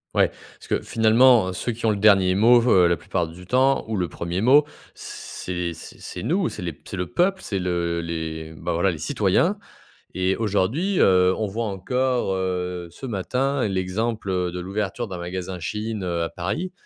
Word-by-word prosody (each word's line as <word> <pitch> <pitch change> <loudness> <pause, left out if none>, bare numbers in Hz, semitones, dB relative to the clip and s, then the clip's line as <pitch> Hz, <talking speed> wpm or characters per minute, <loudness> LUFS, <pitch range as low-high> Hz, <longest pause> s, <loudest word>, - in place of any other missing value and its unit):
Ouais, - - +4 0.3
parce - - -14
que - - +1
finalement, 115 -3 +4
ceux 120 - -2
qui 115 0 -3
ont - - +4
le - - 0
dernier 95 -3 +5
mot, 120 +4 +6
heu, 90 -5 +6
la 85 - +1
plupart 90 -3 -2
du 90 +2 -12
temps 130 +3 +3
ou 110 - -2
le 90 -2 0
premier 85 +3 -4
mot 135 +6 +6 0.3
c'est 90 -1 -5
c'est - - -12
c'est 90 - -7
nous, 180 - 0
c'est - - -8
les 85 -4 -5
c'est 95 - -6
le 90 0 -2
peuple, 190 +8 +1
c'est 100 - -3
le 85 -2 -1
les, 80 -1 -5
bah, 85 +2 -3
voilà, 85 +3 +2
les 80 - -7
citoyens. 105 - +1 0.6
Et 95 +1 +1
aujourd'hui, 115 - 0
heu, 90 -1 +5
on 110 - -1
voit 115 +4 -3
encore, 120 +3 -1
heu, 90 -2 -3
ce 110 - -9
matin 125 +5 -1
l'exemple 95 -1 -1
de 90 - -5
l'ouverture 100 +5 -3
d'un 95 -2 -6
magasin 90 +1 -5
Shein, 105 +5 -4
heu, 85 -2 -1
à 85 - -2
Paris, 145 - -3
95 Hz, 190 wpm, -23 LUFS, 90-115 Hz, 0.6 s, mot